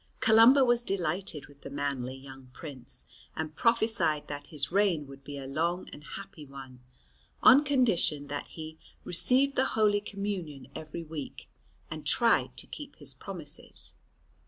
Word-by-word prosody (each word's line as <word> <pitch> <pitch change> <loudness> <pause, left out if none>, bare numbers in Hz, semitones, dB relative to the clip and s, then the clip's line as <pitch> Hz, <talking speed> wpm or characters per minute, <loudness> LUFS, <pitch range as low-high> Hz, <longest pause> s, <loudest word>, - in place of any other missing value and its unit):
Columba 235 +5 +7
was 240 -1 +3
delighted 180 - -1
with 145 -1 -19
the - - -8
manly 140 -2 -3
young 135 -1 -12
prince, 135 -6 -9 0.3
and 155 -1 -4
prophesied 220 -10 +2
that 145 0 -6
his 145 -2 -3
reign 190 -6 +2
would 135 0 -13
be 145 +1 -7
a 135 - -6
long 165 +6 -1
and 150 - -11
happy 195 -1 -9
one, 135 -2 -11 0.6
on 275 +4 +8
condition 230 - +2
that 145 0 -5
he 160 -1 -9 0.2
"received 260 +10 +3
the 265 - +3
Holy 205 -1 +3
Communion 185 -10 -5
every 155 +2 -6
week, 155 -3 -8 0.4
and - - -5
tried - - +3
to - - +1
keep - - -9
his - - -1
promises." - - -4
160 Hz, 150 wpm, -29 LUFS, 140-205 Hz, 0.6 s, on